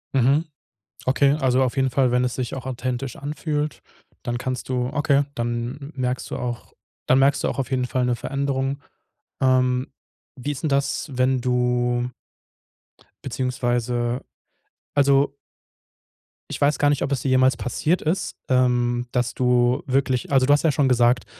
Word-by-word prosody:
Mhm. 135 +5 +3 0.6
Okay, 140 +2 +3
also 130 0 +3
auf 125 - -2
jeden 135 -1 +2
Fall, 130 -1 +2
wenn 125 - +3
es 125 - -2
sich 125 -1 -3
auch 130 - -6
authentisch 130 0 -3
anfühlt, 150 +1 -3 0.4
dann 120 0 -2
kannst 130 0 -4
du 125 -1 -1
okay, 145 -1 +2
dann 120 +5 -4
merkst 125 -1 -2
du - - -3
auch 120 -1 -5 0.3
dann 130 - +4
merkst 140 +1 +3
du - - +1
auch - - -4
auf 135 -4 -2
jeden 125 -1 0
Fall 125 +1 0
'ne 125 - +1
Veränderung. 140 +1 -2 0.6
Ähm, 130 -1 +2 0.5
wie 135 +3 -4
ist 140 - -7
'n 155 - +2
das, 140 +3 0
wenn 130 0 +1
du 125 0 0 1.2
beziehungsweise 120 -1 -1 0.7
also 140 0 +3 1.2
ich - - -5
weiß 145 +1 +3
gar 145 - +3
nicht, 145 -1 +1
ob 140 - -1
es 130 - 0
dir 135 - -1
jemals 130 +1 +4
passiert 155 +8 0
ist, 165 +5 -1
ähm, 125 -1 +2
dass 125 -1 0
du 125 0 +2
wirklich 130 -1 0
also 135 -2 +4
du 145 - +5
hast 145 - +2
ja 160 - +4
schon 140 0 +2
gesagt, 120 0 +3
130 Hz, 165 wpm, -23 LUFS, 125-140 Hz, 1.2 s, du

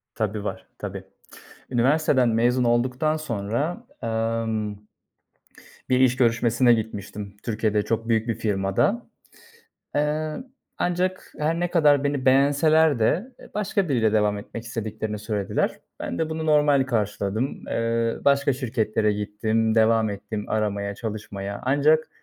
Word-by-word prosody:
Tabii, 105 -1 -2
var. - - -5
Tabii. - - -6 0.7
Üniversiteden 130 0 +3
mezun 120 +2 +2
olduktan 125 +6 +1
sonra, 120 - -3 0.2
emm, 115 -2 -1 1.2
bir 130 0 +3
iş 130 -1 +4
görüşmesine 120 0 +3
gitmiştim 105 -2 -5
Türkiye'de, 110 -2 0
çok 115 +1 -2
büyük 115 +1 +2
bir 115 - 0
firmada. 105 - 0 0.9
Eee, 150 +1 0 0.4
ancak 180 +1 -1
her 160 +3 0
ne 175 -1 0
kadar 145 -4 +4
beni 140 -2 -1
beğenseler 145 +2 +4
de 180 - +1
e - - -15
başka 200 -3 0
biriyle 115 -5 +2
devam 105 -1 +2
etmek 115 +3 -8
istediklerini 110 -2 -4
söylediler. 105 -1 -1 0.3
Ben - - -4
de 160 -1 -1
bunu 160 0 -3
normal 145 -3 +4
karşıladım. 110 +1 -2
Eee, 115 0 0
başka 140 0 +3
şirketlere 110 -4 0
gittim, 110 +2 0
devam 110 -1 +3
ettim 105 +1 -5
aramaya, 100 -2 -1
çalışmaya 100 -3 -5
ancak 145 +4 +3
115 Hz, 125 wpm, -24 LUFS, 110-145 Hz, 1.2 s, iş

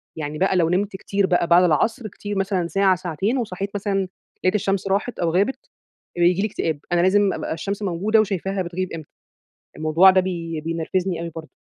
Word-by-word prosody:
يعني 150 -1 -5
بقى 190 +2 +2
لو 170 -3 +3
نمت 195 +3 0
كتير 200 +1 0
بقى 175 -2 +2
بعد 175 +2 +6
العصر 215 - +1
كتير 205 0 -6
مثلًا 190 -3 0
ساعة 190 +3 +3
ساعتين، 185 - -2
وصحيت 200 -4 -3
مثلًا 195 -1 -1 0.4
لاقيت 185 +2 +2
الشمس 195 -1 0
راحت 205 +5 -1
أو 170 - +1
غابت، 200 +10 0 0.5
بييجي 175 +2 +3
لي 215 - +1
اكتئاب، 160 -7 -2
أنا 175 0 +3
لازم 195 +2 +3
أبقى - - -3
الشمس 200 +6 -4
موجودة 200 +3 +1
وشايفاها 195 -2 -1
بتغيب 180 +1 -4
إمتى. 160 -3 -8 0.7
الموضوع 160 +5 +5
ده 185 0 +4
بي 170 -3 -4
بينرفزني 165 +2 -2
أوي 170 0 -4
برضه. 160 -1 -8
185 Hz, 185 wpm, -22 LUFS, 170-200 Hz, 0.7 s, بعد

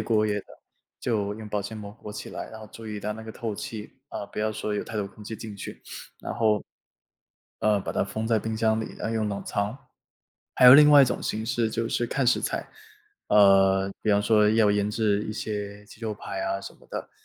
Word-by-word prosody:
过 110 -2 +2
夜 105 -1 0
的， - - -24 0.5
就 105 -3 -1
用 110 0 -8
保 105 0 -2
鲜 100 +3 -6
膜 105 -1 -8
裹 105 - -10
起 105 - -7
来。 - - -6
然 110 - -10
后 110 - -10
注 115 -1 -10
意 105 -1 -4
到 105 +1 -3
那 110 - -8
个 110 - -8
透 110 -1 -4
气， 105 +1 -7 0.2
啊， - - -5
不 - - -10
要 110 +1 +1
说 105 0 -3
有 - - -1
太 110 - -7
多 100 -2 -1
空 105 +2 -13
气 110 +1 -6
进 110 -2 -8
去。 100 - -8 0.4
然 - - -4
后， 110 -2 +2 0.9
呃， 105 -1 +3
把 - - -4
它 - - +1
封 110 +3 -3
在 115 -1 +3
冰 110 +1 -3
箱 110 0 +2
里， - - -6
要 - - -2
用 110 -2 0
冷 100 -1 -3
藏。 100 +4 -2 0.8
还 - - +4
有 125 - +12
另 150 0 +9
外 145 -1 +9
一 - - +8
种 125 - -2
形 110 +1 -2
式， 115 -1 0
就 115 +1 -2
是 120 - 0
看 135 +2 0
食 120 - +4
材。 - - -3 0.6
呃， 95 -1 +5
比 110 - +2
方 100 0 +4
说 105 0 +4
要 110 -1 +4
腌 105 0 +1
制 105 -2 +1
一 110 - -4
些 105 -1 -5
鸡 105 - -16
肉 110 -2 -3
排 335 - -6
啊 340 0 -1
什 - - -9
么 - - -22
的。 - - -5
110 Hz, 255 characters per minute, -26 LUFS, 105-110 Hz, 0.9 s, 有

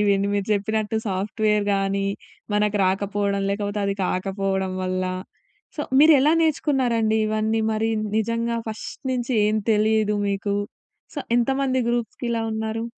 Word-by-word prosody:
ఇవన్నీ 200 -1 +2
మీరు 200 -1 -1
చెప్పినట్టు 215 +2 -1
సాఫ్ట్‌వేర్‌గానీ 200 0 0 0.5
మనకు 210 0 +2
రాకపోవడం, 200 +1 0
లేకపోతే 205 +1 -2
అది 200 - 0
కాకపోవడం 190 0 -1
వల్ల. 185 0 -1 0.7
సో, 295 - -1 0.2
మీరు 310 +1 +8
ఎలా 300 +3 +4
నేర్చుకున్నారండి 255 -8 +1
ఇవన్నీ? 215 +1 0
మరి 220 +1 0 0.3
నిజంగా 230 +1 0
ఫస్ట్ 220 - -7
నుంచి 250 0 -2
ఏం 215 +1 +1
తెలియదు 215 0 +2
మీకు. 200 0 -1 0.6
సో, 295 - -4 0.2
ఎంతమంది 260 +1 +1
గ్రూప్స్‌కి 240 +1 -2
ఇలా 230 -1 0
ఉన్నారు? 220 +1 -3
215 Hz, 125 wpm, -23 LUFS, 200-230 Hz, 0.7 s, మీరు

